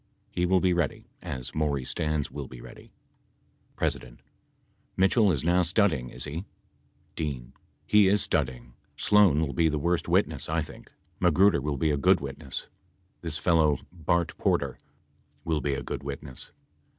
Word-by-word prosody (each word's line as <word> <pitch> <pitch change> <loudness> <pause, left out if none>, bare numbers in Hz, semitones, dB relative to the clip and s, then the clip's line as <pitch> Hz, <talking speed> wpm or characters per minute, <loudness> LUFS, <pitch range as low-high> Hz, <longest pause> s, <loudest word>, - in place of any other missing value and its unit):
He 90 0 0
will 95 +1 +4
be 90 0 +2
ready, 85 -4 -1 0.2
as 65 -2 -6
Maury 75 -4 0
Stans 75 +1 -1
will 70 -2 -6
be 65 -1 -11
ready. - - -13 0.9
P. - - +1 1.1
Mitchell 95 +2 +4
is 70 -6 -1
now 90 +2 +3
studying, 85 - +1
is - - -6
he.? 75 +4 -5 0.7
D. 70 -6 -4 0.3
He 105 -2 +5
is 100 +1 +3
studying. - - -1 0.2
Sloan 100 -8 +4
will 70 - -5
be 80 +5 +3
the 75 - -1
worst 85 +4 0
witness, 80 -5 +1
I 80 +1 +1
think 75 - -10 0.3
Magruder 90 0 +4
will 70 0 -2
be 80 +3 +1
a 75 - +1
good 70 - +4
witness. - - -6 0.5
This 80 -2 -3
fellow, 80 -3 +3
Bart 85 0 0
Porter, - - 0 0.7
will 80 -2 0
be 70 -1 0
a - - -4
good - - -4
witness. 70 -1 -7
80 Hz, 155 wpm, -27 LUFS, 70-90 Hz, 1.1 s, He